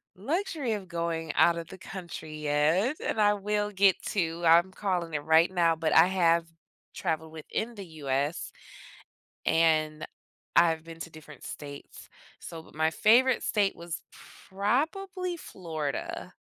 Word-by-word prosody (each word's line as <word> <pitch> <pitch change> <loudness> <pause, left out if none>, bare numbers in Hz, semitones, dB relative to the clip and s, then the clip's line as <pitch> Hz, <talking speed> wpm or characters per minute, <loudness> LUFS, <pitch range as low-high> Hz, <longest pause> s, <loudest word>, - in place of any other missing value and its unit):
luxury 285 - -2
of 195 -3 -5
going 165 -2 -2
outta 170 0 +4
the 190 - -10
country 170 -5 -8
yet- 155 - +2
and - - -1
I 205 0 +5
will 210 +1 -1
get 195 -1 +3
to, 170 -3 -1
I'm 170 +3 +6
calling 180 -5 -2
it 145 -1 -2
right 160 +2 +5
now- 170 -2 +3
but 160 -1 0
I 165 +2 +8
have 170 -3 +3 0.5
traveled 160 0 -2
within 220 +9 -4
the 200 -3 -8 0.2
US, 140 +4 -1 0.9
and 155 -1 +2 0.5
I've 165 -2 +4
been 165 0 -11
to 165 - -6
different 155 -1 -13
states. 145 -1 -9 0.3
So 165 -1 -8
but - - -19
my 160 +1 +2
favorite 240 +7 +4
state 205 -2 +1
was 170 -1 -6 0.5
probably 345 - -1
Florida, 160 - -5
170 Hz, 140 wpm, -28 LUFS, 160-205 Hz, 0.9 s, I